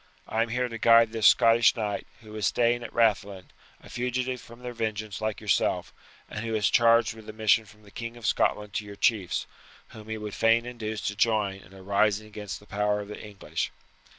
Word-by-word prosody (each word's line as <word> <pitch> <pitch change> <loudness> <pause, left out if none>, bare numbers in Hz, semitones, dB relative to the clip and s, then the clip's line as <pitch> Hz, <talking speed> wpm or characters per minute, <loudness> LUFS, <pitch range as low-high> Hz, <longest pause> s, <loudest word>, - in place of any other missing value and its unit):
I 110 - 0
am 115 - 0
here 125 +2 0
to 115 -1 -7
guide 115 -1 +6
this 110 -2 +3
Scottish 115 0 +5
knight, 105 -3 -3
who 110 -1 -13
is 105 -4 0
staying 120 0 +2
at 120 - -7
Rathlin, 100 -4 0 0.3
a - - -13
fugitive 125 0 -2
from 120 +1 -14
their 125 0 -5
vengeance 110 -3 -4
like 110 -1 -2
yourself, - - 0 0.3
and 105 - -6
who 115 -1 -2
is 105 -1 +2
charged 115 -1 +4
with 110 -1 -13
a - - -7
mission 110 +1 +3
from 105 +1 -19
the 100 - -17
King 115 +2 -7
of 120 - -9
Scotland 105 -1 0
to - - -2
your 100 0 -9
chiefs, 100 -5 +1 0.4
whom 110 0 -12
he 110 - -3
would 105 -1 -6
fain 115 +1 +3
induce 110 -3 -5
to 105 - -3
join 105 -3 +1
in 90 - -18
a 95 -1 -13
rising 100 +2 +1
against 105 -1 -7
the 105 - -18
power 105 0 0
of 100 - -9
the 105 - -8
English." 105 -2 -4
110 Hz, 215 wpm, -27 LUFS, 105-115 Hz, 0.4 s, guide